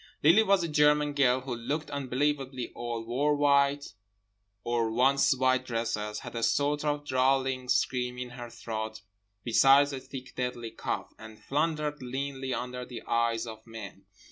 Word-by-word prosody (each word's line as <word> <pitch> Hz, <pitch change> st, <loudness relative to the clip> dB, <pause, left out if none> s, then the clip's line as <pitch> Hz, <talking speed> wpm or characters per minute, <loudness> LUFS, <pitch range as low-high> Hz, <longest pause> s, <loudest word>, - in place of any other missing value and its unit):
Lily 170 Hz, +9 st, +7 dB
was 200 Hz, -4 st, +3 dB
a -, -, -1 dB
German 150 Hz, -1 st, +3 dB
girl, 130 Hz, -3 st, +3 dB
who 130 Hz, -1 st, -5 dB
looked 140 Hz, +7 st, -3 dB
unbelievably 135 Hz, -1 st, -2 dB
old, 120 Hz, -1 st, -4 dB
wore 140 Hz, +6 st, +1 dB
white, 140 Hz, -2 st, +2 dB, 0.7 s
or 120 Hz, -1 st, 0 dB
once 135 Hz, +3 st, +3 dB
white 130 Hz, 0 st, +2 dB
dresses, 115 Hz, -3 st, -3 dB
had -, -, -8 dB
a 115 Hz, -, -3 dB
sort 145 Hz, +4 st, +1 dB
of 145 Hz, -1 st, -1 dB
drawling 130 Hz, -1 st, +1 dB
scream 125 Hz, 0 st, 0 dB
in 125 Hz, -1 st, -5 dB
her 120 Hz, -1 st, -8 dB
throat 110 Hz, -1 st, -5 dB, 0.4 s
besides 135 Hz, +4 st, +5 dB
a 135 Hz, -, -3 dB
thick 130 Hz, -1 st, -9 dB
deadly 125 Hz, -2 st, -3 dB
cough, -, -, -4 dB
and 110 Hz, 0 st, -11 dB
floundered 150 Hz, 0 st, -1 dB
leanly 135 Hz, +1 st, -4 dB
under 125 Hz, +1 st, -4 dB
the 125 Hz, -2 st, -8 dB
eyes 115 Hz, 0 st, 0 dB
of 110 Hz, -1 st, -8 dB
men. 100 Hz, -4 st, -9 dB
130 Hz, 155 wpm, -29 LUFS, 120-145 Hz, 0.7 s, Lily